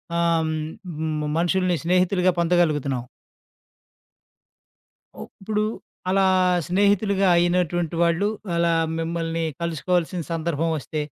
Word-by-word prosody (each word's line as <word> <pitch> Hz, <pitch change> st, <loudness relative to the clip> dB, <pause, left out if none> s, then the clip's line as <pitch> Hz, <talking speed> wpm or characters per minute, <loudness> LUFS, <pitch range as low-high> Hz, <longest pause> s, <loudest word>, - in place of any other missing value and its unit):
ఆహ్, 170 Hz, -1 st, +2 dB
హ్మ్. 155 Hz, 0 st, -3 dB, 0.2 s
హ్మ్. 155 Hz, -1 st, -2 dB
మనుషుల్ని 180 Hz, +1 st, +1 dB
స్నేహితులుగా 180 Hz, +1 st, +2 dB
పొందగలుగుతున్నాం. 150 Hz, -7 st, +1 dB, 2.2 s
ఓహ్! -, -, -8 dB
ఇప్పుడు 210 Hz, +1 st, -1 dB, 0.5 s
అలా 195 Hz, +1 st, +3 dB, 0.4 s
స్నేహితులుగా 200 Hz, +1 st, +2 dB
అయినటువంటి 175 Hz, -1 st, +1 dB
వాళ్ళు 170 Hz, +4 st, +2 dB, 0.3 s
అలా 170 Hz, 0 st, +2 dB, 0.3 s
మిమ్మల్ని 165 Hz, 0 st, -2 dB, 0.2 s
కలుసుకోవాల్సిన 170 Hz, +1 st, -1 dB
సందర్భం 165 Hz, -1 st, -1 dB
ఒస్తే. 150 Hz, +2 st, -4 dB
170 Hz, 90 wpm, -23 LUFS, 165-180 Hz, 2.2 s, అలా